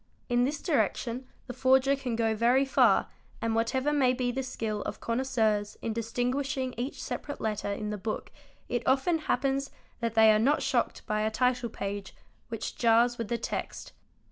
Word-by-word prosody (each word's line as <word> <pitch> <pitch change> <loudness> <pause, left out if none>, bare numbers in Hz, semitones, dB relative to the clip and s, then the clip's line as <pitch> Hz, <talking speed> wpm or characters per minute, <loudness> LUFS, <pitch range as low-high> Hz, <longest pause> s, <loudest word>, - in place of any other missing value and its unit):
In 245 0 +3
this 290 +2 -3
direction 255 -5 0 0.2
the 250 - -6
forger 265 +2 +4
can 255 -4 -3
go 225 -1 +1
very 240 +5 +3
far 270 - +4 0.3
and 230 -1 -1
whatever 260 +6 +1
may 260 -4 +3
be 250 -1 -1
the 265 +2 -2
skill 225 -5 -3
of - - -5
connoisseurs 230 -4 0
in 225 - -3
distinguishing 255 +4 -1
each 250 +4 -4
separate 290 - -5
letter 210 -2 -2
in 210 +1 -3
the 210 - -4
book 215 +2 -4 0.4
it 240 -1 -1
often 275 +6 +3
happens 275 -2 0 0.3
that 230 -1 -2
they 220 -1 +7
are 215 - +3
not 275 +7 +2
shocked - - 0
by 215 -2 0
a 215 - +1
title 250 +1 +1
page 200 -1 -5 0.3
which 225 -2 -5
jars 235 +1 +3
with 230 - -2
the 235 - -1
text. - - -5
245 Hz, 175 wpm, -29 LUFS, 225-265 Hz, 0.4 s, they